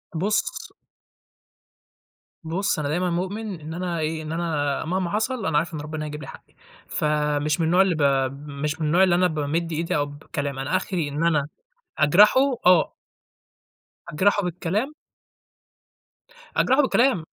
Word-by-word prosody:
بُص 200 +6 -1 1.7
بُص 165 +2 -1
أنا 145 -1 -2
دايمًا 180 +3 0
مؤمن 190 +2 -3
إن 155 +2 -7
أنا 175 -1 -3
إيه، 155 +1 -2
إن 155 - -6
أنا 160 -3 -1
مهما 180 +1 -1
حصل 225 +4 -1
أنا 155 -2 +1
عارف 165 +3 -1
إن 150 - -4
ربنا 155 0 -5
هيجيب 150 0 -6
لي - - -8
حقّي، - - -13 0.3
فمش 150 +1 0
من 165 - +2
النوع 180 +3 +4
اللي 190 -3 +2
ب 150 - -3 0.5
مش 150 +3 -3
من 155 - 0
النوع 175 +5 +4
اللي 180 -2 +4
أنا 180 +1 +3
بامِد 160 +2 -2
إيدي 165 +1 -1
أو 145 - +1
بكلام، 145 -1 -5
أنا 135 +7 -1
آخري 175 -6 -2
إن 150 +3 -2
أنا 150 -4 +2 0.5
أجرحه، 190 - +6 0.3
آه. 180 -4 +5 1.2
أجرحه 205 +6 +2
بالكلام. 185 - -2 1.6
أجرحه 260 +4 +4
بالكلام. 255 - +2
165 Hz, 150 wpm, -24 LUFS, 150-185 Hz, 1.7 s, أجرحه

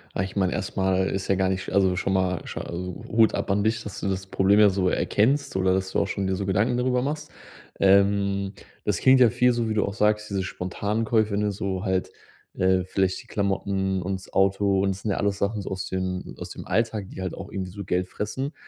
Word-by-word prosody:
Ah, 95 - 0
ich 95 - -6
meine, 95 -2 +1
erst - - -4
mal 95 0 +2
ist 95 -1 -3
ja 95 - +3
gar 95 0 +1
nicht 95 0 -1
sch - - -7
also, 95 -2 +3
schon 95 +1 -1
mal, 95 -2 0
sch - - -7
also, 90 +5 -5
Hut 110 -1 +4
ab - - -2
an 100 +1 +2
dich, 110 +1 0
dass 105 - -7
du - - -3
das 95 0 -2
Problem 100 +2 +3
ja 105 - +7
so 95 -1 +1
erkennst 135 +6 +1
oder 95 0 +2
dass 95 0 -1
du - - +1
auch - - +1
schon 100 -2 -2
dir 95 - 0
so 100 +1 -3
Gedanken 105 +5 +1
darüber 125 0 +1
machst. 150 +2 -4 0.5
Ähm, 100 0 +3 0.3
das 105 -4 +1
klingt 130 0 +6
ja 125 -3 +7
viel 125 +1 +3
so, 115 -1 -1
wie 110 - 0
du 105 - +1
auch 100 - -4
sagst: 105 +1 +1
„Diese 95 -1 -1
spontanen 100 +4 -3
Käufe”, 110 -2 +2
ne, 105 0 +1
so 95 -2 -3
halt, 95 -2 -1 0.5
äh, 95 0 +3
„vielleicht 95 +2 0
die 120 - -21
Klamotten 95 -2 -1
und 95 +2 -2
das 95 - -15
Auto 95 0 +2
und 100 - +1
das 95 +1 -6
sind 105 - -1
ja - - -1
alles 100 -1 0
Sachen 105 +1 -1
so - - -6
aus 95 0 -3
den 95 0 -3
aus - - -7
dem - - -8
Alltag, 110 -1 -1
die - - -8
halt 95 - -3
auch - - -9
irgendwie 95 -2 -4
so 100 +2 -7
Geld 90 0 -1
fressen.” 130 - -4
100 Hz, 250 wpm, -25 LUFS, 95-105 Hz, 0.5 s, ja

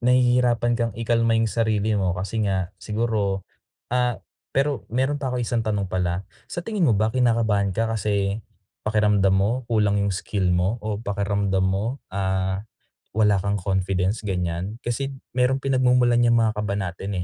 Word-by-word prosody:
nahihirapan 125 -1 +3
kang 115 -3 -1
ikalma 115 0 +2
yung 115 -1 +1
sarili 110 -1 +1
mo, 95 -3 +1
kasi 100 +4 -3
nga, 95 -2 -1
siguro, 105 -2 -1 0.5
ah, 125 -1 +2 0.4
pero 140 -1 0
meron 130 +4 0
pa 135 - -2
akong 125 -1 -1
isang 115 0 0
tanong 105 -3 -1
pala, 90 +1 -1 0.2
sa 175 - -4
tingin 205 -7 +1
mo 115 - +4
ba, 110 +2 +2
kinakabahan 110 -6 +2
ka 115 - +2
kasi 100 -1 0 0.5
pakiramdam 105 -3 +3
mo 100 +2 +2 0.2
kulang 105 -3 +2
yung 100 -1 0
skill 95 +1 -1
mo, 95 +7 +1
o 105 -1 -3
pakiramdam 100 -2 0
mo, 105 +8 -1 0.2
ah, 95 0 -1 0.5
wala 105 -1 +3
kang 100 +1 0
confidence, 95 +1 0
ganyan? 90 0 -3
Kasi 135 +3 -1 0.2
merong 125 +1 +2
pinagmumulan 125 -2 +3
yan 120 -1 +4
mga 110 -1 +2
kaba 105 -1 -1
natin 95 0 -4
105 Hz, 155 wpm, -24 LUFS, 100-120 Hz, 0.5 s, mo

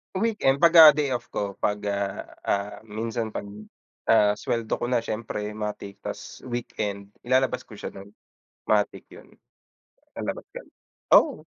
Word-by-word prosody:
Weekend, 190 -10 +1
pagka 160 -3 +9
day-off 130 -6 -1
ko 100 -1 -4
pag, 105 0 -1
ah, 100 -1 -2 0.2
ah, 100 +1 -1
minsan 110 +1 -4
pag, - - -3 0.6
ah, 105 -1 +5
sweldo 115 -2 -2
ko 120 - -2
na 120 -2 +1
siyempre 105 -2 -4
matik 105 -2 -6
tas 105 0 -7
weekend 105 -4 -4 0.2
ilalabas 130 -1 +1
ko 110 - -11
siya - - -6
nun, 100 +1 -13 0.6
matic 105 -1 +1
yun, - - -14 0.9
lalabas - - -5
kami. - - -10 0.5
Oo, - - +2
110 Hz, 135 wpm, -25 LUFS, 105-125 Hz, 0.9 s, pagka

